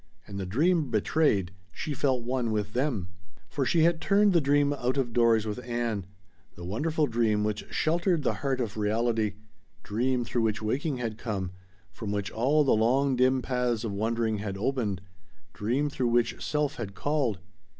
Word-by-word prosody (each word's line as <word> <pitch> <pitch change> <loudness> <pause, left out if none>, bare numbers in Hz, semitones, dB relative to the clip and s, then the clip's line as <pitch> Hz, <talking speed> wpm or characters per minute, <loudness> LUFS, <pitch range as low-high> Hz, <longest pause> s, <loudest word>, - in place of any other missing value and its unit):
And 100 0 -7
the 95 - -4
dream 155 - +2
betrayed 105 - +2 0.2
she 150 - -4
felt 130 -3 0
one 125 -1 -1
with 105 -1 -2
them. 120 -9 -1 0.4
For 135 -3 -1
she 160 +5 +3
had 165 0 +3
turned 200 +3 +4
the 170 - +4
dream 145 0 +3
out 130 -1 -1
of 120 -4 -1
doors 115 -2 +4
with 110 +4 -4
Ann: 120 -5 -2 0.5
the 85 - -9
wonderful 150 - 0
dream 110 -5 +1
which 105 0 -2
sheltered 170 0 +1
the - - +1
heart 135 -2 0
of 110 -4 -3
reality, 110 0 0 0.5
dream 125 +3 0
through 120 0 -1
which 110 -1 0
waking 130 +6 -1
had 115 -3 -4
come, 100 -6 -3 0.4
from 100 +5 -5
which 100 -1 -2
all 140 +7 +3
the 135 - +2
long 130 +5 +3
dim 130 +1 +3
paths 125 -2 0
of 110 - -2
wondering 110 +1 0
had 100 -2 -4
opened 105 -4 -1 0.5
dream 125 +8 0
through 130 -3 -1
which 120 0 +1
self 150 0 -1
had 100 -4 -5
called. 135 -2 0
120 Hz, 175 wpm, -28 LUFS, 105-140 Hz, 0.5 s, turned